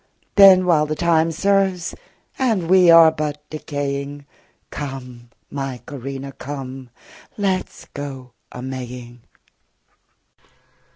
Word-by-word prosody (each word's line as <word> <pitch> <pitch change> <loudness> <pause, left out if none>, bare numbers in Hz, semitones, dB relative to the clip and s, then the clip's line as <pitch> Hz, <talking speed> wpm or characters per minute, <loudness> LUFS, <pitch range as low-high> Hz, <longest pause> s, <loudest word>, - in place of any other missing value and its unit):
Then, 190 -2 +8
while 155 -4 +3
time 165 +1 +1
serves, 195 0 +1 0.5
and 215 -10 0
we 185 -2 +6
are 165 -1 +8
but 150 -1 -5
decaying, 145 -1 -4 0.5
Come, 125 -4 -7 0.2
my 135 -3 -4
Corinna, 135 0 -7
come, 135 -2 -8 0.5
let 195 -3 0
's - - -15
go 135 -3 -7 0.2
a 125 - -8
Maying. 125 -2 -7
145 Hz, 100 wpm, -21 LUFS, 135-170 Hz, 0.5 s, Then